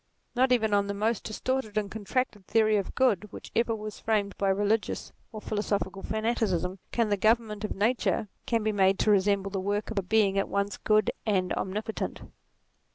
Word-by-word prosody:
Not 255 +1 +3
even 220 -4 +3
on 200 0 +3
the 200 - -3
most 220 +2 0
distorted 220 0 -2
and 205 -2 -1
contracted 220 -1 -2
theory 215 -1 +3
of 200 -2 -2
good 210 -6 +2
which - - -10
ever 230 -1 +2
was 215 -1 -7
framed 210 -3 0
by 195 - 0
religious 205 +3 0 0.2
or 220 - -6
philosophical 205 -2 -2
fanaticism, 210 -5 -1
can 230 -3 +1
the 205 - +2
government 220 0 +1
of 215 - -3
Nature 220 +1 +1 0.2
be 225 -2 +1
made 195 -1 +3
to 215 - +3
resemble 200 0 +2
the 195 - -2
work 205 +3 -2
of 215 - 0
a - - 0
being 195 0 +2
at 195 - -1
once 200 0 -1
good 215 -1 +2 0.2
and 185 -3 +1
omnipotent. 210 +3 -3
210 Hz, 180 wpm, -28 LUFS, 200-220 Hz, 0.2 s, Not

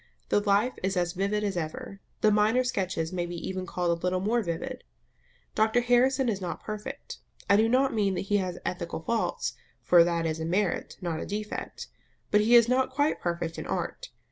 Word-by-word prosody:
The - - +4
life 205 +4 +2
is 190 0 -1
as 175 -1 0
vivid 200 +3 -1
as 200 -2 -1
ever; 170 +4 -5 0.2
the 215 - +5
minor 215 +4 +3
sketches 185 -8 -2
may 175 -1 -2
be 175 - -6
even 185 0 -4
called 175 -1 0
a 170 0 -2
little 180 0 0
more 225 +5 +1
vivid. 235 +8 -4 0.7
Dr 220 +3 +3
Harrison 250 +2 +3
is 200 -4 -1
not 175 -2 -5
perfect. 220 +7 -7 0.3
I 200 - +5
do 220 +2 +4
not 260 +2 +3
mean 200 -4 +1
that - - -1
he 205 +1 +1
has 185 -2 -2
ethical 170 -2 -3
faults, 230 +5 -1 0.3
for 175 -1 +7
that 170 -1 0
is 160 0 -1
a 160 - -3
merit, 185 +2 -1
not 170 -3 -2
a - - -4
defect; 210 +1 -5 0.5
but 210 - +5
he 230 +3 +5
is 235 -1 +7
not 255 +1 +2
quite 290 +3 0
perfect 170 -1 -2
in - - -6
art. - - -3
200 Hz, 200 wpm, -28 LUFS, 175-235 Hz, 0.7 s, for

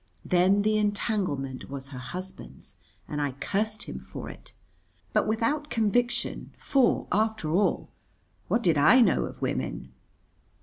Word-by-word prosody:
Then 185 +3 +4
the 215 0 +2
entanglement 195 - -1
was 135 -1 -6
her 130 -3 -7
husband's, 130 - -8 0.3
and 150 0 -3
I 145 -2 -1
cursed 210 +10 -2
him - - -7
for - - -8
it. - - -14 0.6
But - - +2
without 235 +8 0
conviction, 240 +2 0
for, 270 -3 +2
after 215 -6 +1
all, 190 +5 +1 0.6
what 235 - +1
did 165 -5 +3
I 200 - +7
know 230 - +3
of - - -8
women? - - -3
205 Hz, 135 wpm, -27 LUFS, 150-220 Hz, 0.6 s, I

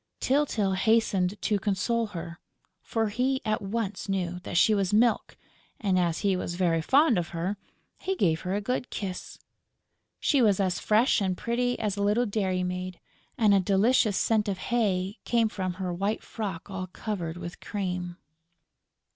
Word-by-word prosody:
Tyltyl 255 -8 +1
hastened 205 -3 +2
to 210 -2 +1
console 220 +3 0
her, 170 -3 -7 0.4
for 225 -2 -1
he 255 +5 0
at 215 0 0
once 205 0 -3
knew 180 -2 -1
that 175 - -4
she 215 - +5
was 195 -3 +1
Milk; 225 +2 +2 0.4
and, 190 -4 +2
as 170 -2 0
he 200 -2 +2
was 175 -1 -3
very 170 -3 +2
fond 265 - +4
of 170 - -3
her, 185 +5 -1 0.4
he 385 - -2
gave 160 - +1
her 185 +1 -2
a 205 - -1
good 250 +3 -2
kiss. 190 -3 -5 0.8
She 280 -4 +3
was 205 -4 +4
as 185 -2 +1
fresh 220 +2 +3
and 185 -2 0
pretty 245 +1 0
as 210 -2 -2
a - - -1
little 210 +4 +2
dairy 190 -4 0
maid; 180 0 -4 0.4
and 215 -5 +4
a 200 - +5
delicious 205 +3 +3
scent 220 -2 +2
of 195 -2 -1
hay 195 -2 -1
came 230 -2 +2
from 185 -3 -3
her 180 -1 -3
white 200 +5 -1
frock 195 -7 -5
all 190 -2 -5
covered 180 -4 -4
with 175 0 -7
cream. 180 -3 -4
200 Hz, 170 wpm, -27 LUFS, 180-225 Hz, 0.8 s, she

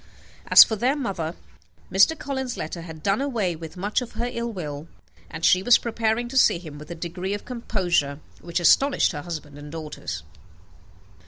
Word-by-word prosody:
As - - +11
for 220 - -3
their 250 +6 +1
mother, 190 - -3 0.6
Mr. 195 +13 +5
Collins's 265 -3 -4
letter 170 +2 -5
had 160 -2 -10
done 200 +5 +1
away 225 -11 -1 0.2
much 205 +6 -1
of 245 - -8
her 240 - -2
ill 235 0 -3
will, 155 -6 -6 0.4
and 165 0 -3
she 185 - +5
was 235 +5 +6
preparing 230 0 -1
to 265 - -3
see 180 - +5
him 155 -4 -10
with 150 - -11
a 170 - -5
degree 180 +4 -4
of 205 - -9
composure 180 - -1 0.2
which 170 +1 -2
astonished 270 - +4
her 145 - -5
husband 150 -3 -7
and 145 0 -10
daughters. 150 - -6
185 Hz, 175 wpm, -24 LUFS, 160-235 Hz, 0.6 s, As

